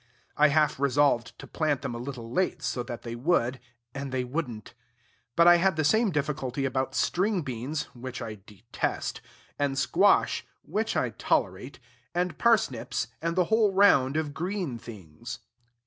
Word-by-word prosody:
I 150 - +6
half 150 -1 +2
resolved 140 -3 +2
to - - -10
plant 150 -4 -1
them - - -3
a 120 - -5
little 120 -2 -7
late, 175 -1 0
so 125 0 -1
that 120 -1 -7
they 115 - -5
would, 125 -1 +1 0.3
and 140 -1 -5
they 130 -1 -1
would 135 +3 -2
n't. 110 -3 -10 0.6
But 170 0 +6
I 175 0 +9
had 190 0 +2
the 155 - 0
same 220 +8 +3
difficulty 140 -4 -2
about 130 0 -1
string 185 - +1
beans 135 +4 -3
(which 125 0 -7
I 110 -4 -6
detest), 110 +3 -4 0.4
and 140 -1 0
squash - - +3 0.2
(which - - -1
I - - 0
tolerate), 95 +9 -1 0.4
and 175 -3 -1
parsnips, 130 - +1
and 165 +1 -1
the 185 - +4
whole 220 -2 +4
round 150 -8 +5
of 155 -2 -2
green 175 - -3
things. 95 -11 -9
140 Hz, 165 wpm, -27 LUFS, 120-165 Hz, 0.6 s, I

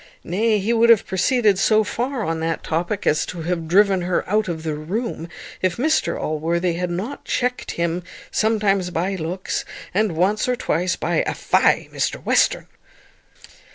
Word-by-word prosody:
Nay, 215 +5 +1
he 205 +4 0
would 235 0 +4
have 230 -3 +6
proceeded 210 0 +2
so 215 +1 +4
far 245 +3 -2
on 165 -2 -2
that 165 0 -2
topic 175 +5 -2
as 150 - +3
to 170 -3 -6
have 165 -1 -2
driven 195 +2 +4
her 175 0 -1
out 215 +2 +1
of 160 -3 -4
the 160 -1 -2
room, 170 +3 -4 0.3
if 185 -2 0
Mr 310 +6 +1
Allworthy 170 +3 -1
had 180 +1 -2
not 195 +11 -4
checkt 250 0 -2
him, 170 +1 -1 0.3
sometimes 205 -4 +1
by 180 +3 -1
looks, 180 +2 -3 0.3
and 210 -1 +1
once 190 +8 +1
or 250 - +2
twice 180 -4 0
by 170 -1 -1
a - - -1
"Fie! - - +2
Mr - - 0
Western!" - - +2
185 Hz, 165 wpm, -21 LUFS, 170-215 Hz, 0.3 s, have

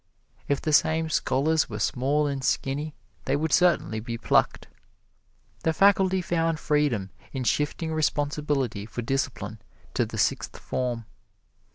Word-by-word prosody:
If 140 -1 +1
the 155 - 0
same 160 +1 +3
scholars 150 +3 +1
were 105 - -5
small 135 +7 +1
and 140 -2 -2
skinny, 145 +4 -1 0.3
they - - +1
would 150 +1 -1
certainly 170 -11 +3
be 115 +1 -5
plucked. - - +1 0.9
The 160 - +1
faculty 190 0 +4
found 165 -2 0
freedom 145 -12 0 0.2
in 130 -2 -2
shifting 150 +5 0
responsibility 145 -7 -1
for 120 - -5
discipline 135 +3 -2 0.3
to - - +1
the - - -7
Sixth - - 0
Form. 120 -3 -3
145 Hz, 135 wpm, -26 LUFS, 130-160 Hz, 0.9 s, faculty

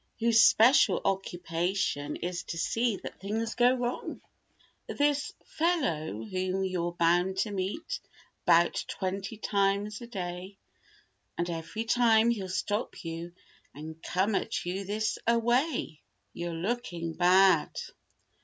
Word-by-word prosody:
Whose 230 -1 +5
special 245 +8 +6
occupation 175 -5 -1
is 175 +1 -3
to 165 - -5
see 225 +6 +1
that - - -8
things 220 +3 -2
go 245 +1 +4
wrong. 245 -1 -3 0.7
This 290 0 0
"fellow" 170 - -1
whom 185 - -2
you're 175 -2 -2
bound 175 +3 +2
to 210 - -6
meet 195 - -3 0.4
'bout 170 +1 +4
twenty 195 +3 -4
times 200 +1 0
a 235 - -8
day 185 -2 -6 0.8
And 170 - -1
every 165 +7 -4
time 230 -1 +4
he'll 195 -5 -3
stop 205 +4 -2
you 165 +1 -5 0.4
and 160 +2 -9
come 190 +4 0
at 210 0 -1
you 190 +3 -3
this 215 +2 -1
a 235 0 +4
way— 240 - 0 0.3
"You're 170 0 -4
looking 175 -3 -3
bad." 185 +3 +4
195 Hz, 125 wpm, -29 LUFS, 175-225 Hz, 0.8 s, special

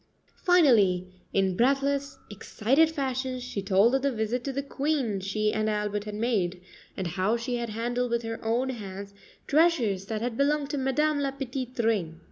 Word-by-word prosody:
Finally, 230 - +4 0.3
in 190 -2 +1
breathless, 275 +4 +1
excited 245 +9 +2
fashion, 260 -4 -2
she 245 -5 -4
told 195 +5 +3
of 270 - +2
the 280 +1 +1
visit 230 +1 -2
to 275 - -2
the 275 +1 -3
Queen 275 -7 -1
she 210 +2 -1
and 215 0 0
Albert 210 -1 -2
had 210 -1 -5
made, 205 -6 0 0.4
and 190 - -2
of 170 - -4
how 195 +5 +1
she 240 +1 -3
had 235 -1 -3
handled 240 +3 -2
with 235 0 -1
her 225 0 -5
own 235 +4 0
hands 200 -4 -7 0.3
treasures 255 - +2
that 220 +1 -3
had 245 -1 -2
belonged 285 0 +1
to 290 - -2
Madame 290 +3 +1
La 280 -1 0
Petite 260 -2 -5
Reine. 200 -9 0
235 Hz, 180 wpm, -27 LUFS, 210-275 Hz, 0.4 s, Finally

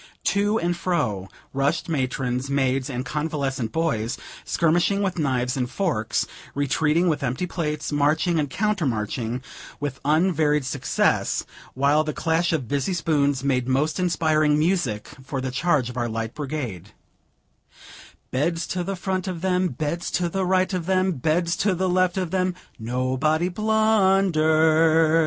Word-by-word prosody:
To 205 +2 +2
and 175 +1 0
fro 125 - -1 0.3
rushed 140 +4 0
matrons, 130 -3 -1
maids, 135 -1 +1
and 125 -1 -3
convalescent 140 -4 -2
"boys," 135 -9 -1 0.3
skirmishing 175 +5 +2
with 190 -3 -1
knives 125 -4 0
and 125 -2 -1
forks; 150 - -1 0.3
retreating 150 +5 +2
with 155 -3 +1
empty 130 +6 -1
plates; 155 -4 -3
marching 150 +4 +2
and 145 -2 -1
counter 205 -3 0
marching, 115 +2 -2 0.4
with 140 -2 -4
unvaried 150 -2 +2
success, 130 - 0 0.3
while 140 +3 +3
the 155 -1 -3
clash 165 +3 +1
of 145 -7 -1
busy 145 - -1
spoons 145 -6 +1
made 130 -3 +1
most 140 +6 +1
inspiring 155 -4 +2
music 150 - 0 0.2
for 135 0 -4
the 130 0 -3
charge 145 -2 +1
of 125 0 -7
our 120 -1 -1
Light 115 0 -3
Brigade: 125 - -5 1.4
"Beds 165 +6 0
to 180 -1 -1
the 195 +2 -3
front 185 0 -2
of 180 -3 -4
them, 185 0 +1
Beds 155 +4 -3
to 175 -1 -1
the 190 +1 -1
right 185 +1 +2
of 180 -2 -2
them, 190 0 +2
Beds 165 +3 0
to 195 -2 +1
the 185 +2 0
left 185 0 +2
of 180 -3 -2
them, 185 -1 0 0.2
Nobody 130 +8 0
blundered. 175 -7 +3
155 Hz, 145 wpm, -24 LUFS, 130-180 Hz, 1.4 s, while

